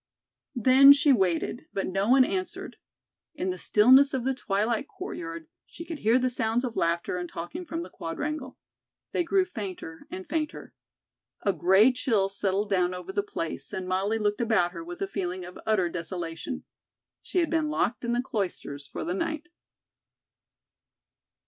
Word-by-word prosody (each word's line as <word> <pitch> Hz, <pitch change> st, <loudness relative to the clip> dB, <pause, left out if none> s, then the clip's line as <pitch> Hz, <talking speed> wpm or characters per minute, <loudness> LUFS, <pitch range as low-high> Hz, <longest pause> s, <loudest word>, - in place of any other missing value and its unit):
Then 260 Hz, +4 st, +8 dB
she 285 Hz, 0 st, +4 dB
waited, 190 Hz, +1 st, 0 dB
but 195 Hz, -, -1 dB
no 195 Hz, +3 st, -1 dB
one 260 Hz, 0 st, +7 dB
answered. 370 Hz, +3 st, -4 dB, 0.6 s
In 185 Hz, -10 st, -1 dB
the 180 Hz, -, -6 dB
stillness 260 Hz, +6 st, +6 dB
of 255 Hz, -2 st, -2 dB
the 265 Hz, -, +2 dB
twilit 220 Hz, +2 st, -1 dB
courtyard 165 Hz, -, -7 dB, 0.2 s
she 335 Hz, -, -9 dB
could 325 Hz, -3 st, -6 dB
hear 225 Hz, +2 st, +4 dB
the 255 Hz, 0 st, +1 dB
sounds 230 Hz, 0 st, 0 dB
of 245 Hz, -3 st, -3 dB
laughter 170 Hz, +1 st, 0 dB
and 175 Hz, -1 st, -4 dB
talking 315 Hz, -, -6 dB
from 330 Hz, +1 st, -3 dB
the -, -, -10 dB
Quadrangle. 260 Hz, -, -5 dB, 0.5 s
They 350 Hz, -, +1 dB
grew 375 Hz, +2 st, +2 dB
fainter 195 Hz, -, -7 dB
and 370 Hz, 0 st, -7 dB
fainter. 305 Hz, 0 st, -3 dB, 0.7 s
A 200 Hz, -, +2 dB
gray 190 Hz, -, +5 dB
chill 225 Hz, -6 st, +1 dB
settled 200 Hz, +1 st, -1 dB
down 180 Hz, -1 st, +2 dB
over 180 Hz, +1 st, -7 dB
the 205 Hz, -, 0 dB
place 165 Hz, -5 st, -5 dB
and 185 Hz, -1 st, -4 dB
Molly 195 Hz, +4 st, 0 dB
looked 210 Hz, +1 st, 0 dB
about 220 Hz, -7 st, +2 dB
her 170 Hz, -2 st, -7 dB
with 175 Hz, +3 st, -6 dB
a -, -, -1 dB
feeling 185 Hz, -2 st, -4 dB
of 180 Hz, -, -10 dB
utter 210 Hz, -5 st, +3 dB
desolation. 170 Hz, -, -5 dB, 0.6 s
She -, -, -5 dB
had 340 Hz, -2 st, +2 dB
been 320 Hz, -2 st, +1 dB
locked 240 Hz, -6 st, -1 dB
in 235 Hz, -, -1 dB
the 245 Hz, +1 st, 0 dB
Cloisters 175 Hz, -, -4 dB
for -, -, -5 dB
the 175 Hz, -, -2 dB
night. 310 Hz, -, -3 dB
210 Hz, 170 wpm, -27 LUFS, 180-265 Hz, 0.7 s, Then